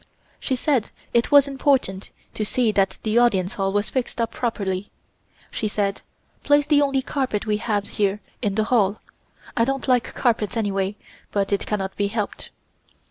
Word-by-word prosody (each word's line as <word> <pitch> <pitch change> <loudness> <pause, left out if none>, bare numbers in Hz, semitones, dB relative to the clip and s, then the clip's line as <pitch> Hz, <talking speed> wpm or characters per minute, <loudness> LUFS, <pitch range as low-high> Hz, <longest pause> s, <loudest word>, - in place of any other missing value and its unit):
She 265 - -1
said 255 -3 +1 0.2
it 235 0 +3
was 285 -1 +7
important 265 -8 0 0.2
to 215 - -2
see 230 +1 +1
that 195 -2 +1
the 220 +1 +3
Audience 195 -6 +2
Hall 195 -1 -1
was 205 +1 0
fixed 255 -2 -2
up 230 0 0
properly. 205 -6 -2 0.6
She 215 - -2
said: 200 -1 -1 0.4
"Place 290 0 +4
the 295 -1 +4
only 275 -2 +1
carpet 255 -8 -2
we 210 -1 +1
have 210 -2 -1
here 205 0 0 0.2
in 205 -4 0
the 220 - +2
hall. 215 -3 +2 0.6
I 230 - +3
don't 270 +2 -1
like 250 -2 +1
carpets 225 -4 +1
anyway, 200 -2 0 0.4
but 200 0 0
it 200 - -1
cannot 195 -2 -2
be 205 - +1
helped." 210 0 -4
215 Hz, 170 wpm, -23 LUFS, 200-250 Hz, 0.6 s, was